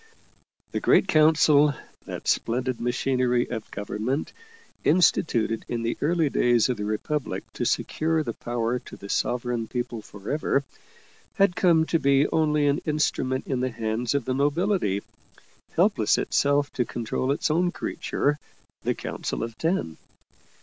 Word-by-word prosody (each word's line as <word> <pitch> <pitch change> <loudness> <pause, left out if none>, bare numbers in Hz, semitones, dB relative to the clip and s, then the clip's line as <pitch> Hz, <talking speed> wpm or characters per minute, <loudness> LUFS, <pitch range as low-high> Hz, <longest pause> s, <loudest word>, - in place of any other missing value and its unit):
The - - -1
Great - - +4
Council, 155 -3 +5 0.3
that - - -7
splendid 125 +1 0
machinery 125 0 +1
of 110 -3 -5
government, 110 +7 -3 0.5
instituted 135 -9 +2
in 115 -1 -2
the 115 - -1
early 160 +1 +2
days 120 -3 +3
of 125 - -1
the 105 - -3
Republic 130 +8 -2
to - - -3
secure 160 0 0
the 115 - -4
power 120 +1 -2
to - - -12
the 100 - -10
Sovereign 120 -1 -1
People 120 -2 -4
forever, 125 +8 -2 0.7
had 195 -2 +3
come 165 -4 +4
to 165 - +1
be 140 0 +3
only 150 -2 +2
an 145 +3 +2
instrument 150 -4 0
in 130 -3 -2
the 130 +1 0
hands 115 +1 -2
of 140 -4 0
the 130 - -1
nobility, 145 - +1 0.7
helpless - - +3
itself 145 0 +1
to 125 - +1
control 120 +3 -2
its 145 - 0
own 175 +3 +2
creature, 145 -3 -2 0.4
the - - -1
Council - - -4
of 115 -1 -5
Ten. 165 - -1
130 Hz, 145 wpm, -25 LUFS, 120-150 Hz, 0.7 s, Council